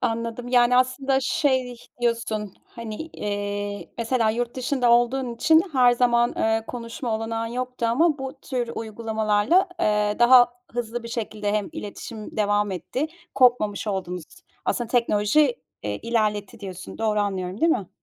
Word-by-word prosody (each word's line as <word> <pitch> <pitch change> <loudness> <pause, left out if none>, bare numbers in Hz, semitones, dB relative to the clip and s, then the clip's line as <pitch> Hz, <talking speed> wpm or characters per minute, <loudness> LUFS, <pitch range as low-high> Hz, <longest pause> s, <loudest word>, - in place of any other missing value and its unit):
Anladım. 230 +1 -2
Yani 245 0 +4
aslında 265 +1 +2
şey 260 -4 0 0.2
diyorsun, 230 -4 -1
hani, 230 -2 -8
eee, 205 -7 -4
mesela 230 -1 +1
yurt 240 +1 -2
dışında 255 -1 +1
olduğun 240 +1 +2
için 315 +7 +5
her 250 -2 +5
zaman, 240 -1 +2
ııı, 225 0 +1
konuşma 235 0 -4
olanağın 225 0 -3
yoktu 250 0 -3
ama 300 +6 +2
bu 265 0 -6
tür 245 -3 -3
uygulamalarla, 220 - +1
eee, 210 0 +2
daha 245 0 +7 0.2
hızlı 240 0 -3
bir 235 - -7
şekilde 215 -3 -3
hem 210 -2 0
iletişim 215 +2 -8
devam 205 -1 +1
etti, 190 - -3 0.3
kopmamış 240 -5 +3
oldunuz. 180 -3 -3 0.4
Aslında 240 -2 -1
teknoloji, 240 +3 +3 0.3
eee, 105 0 -3
ilerletti 215 -1 -1
diyorsun. 185 -2 -8
Doğru 215 -2 +1
anlıyorum 190 -1 -3
değil 330 0 +4
mi? 195 -7 -2
230 Hz, 140 wpm, -24 LUFS, 210-250 Hz, 0.4 s, daha